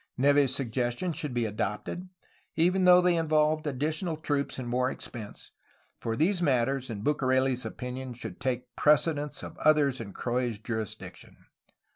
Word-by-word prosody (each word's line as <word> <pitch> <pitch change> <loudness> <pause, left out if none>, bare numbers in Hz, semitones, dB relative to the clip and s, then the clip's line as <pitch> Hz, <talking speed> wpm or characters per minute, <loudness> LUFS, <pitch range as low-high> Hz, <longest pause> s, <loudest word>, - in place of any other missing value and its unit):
Neve's 140 0 +4
suggestions 125 +6 -1
should 150 -2 -3
be 120 -1 0
adopted, 110 - -3 0.5
even 180 +3 +3
though 180 0 +8
they 180 -1 +3
involved 155 -1 +2
additional 155 +4 -1
troops 145 -2 -2
and 130 -2 -5
more 125 +1 +1
expense, 110 -6 -8 0.5
for 115 -1 -2
these 175 - +2
matters, 135 -3 +1
in 105 -3 -5
BucareU's 130 -2 +1
opinion, 125 0 -6
should 115 -5 -8
take 125 -2 -3
precedence 150 -1 +2
of - - -9
others 145 -5 +3
in 100 -3 -7
Croix's 120 0 -2
juris 110 -1 -3
diction. - - -12
135 Hz, 145 wpm, -29 LUFS, 120-155 Hz, 0.5 s, though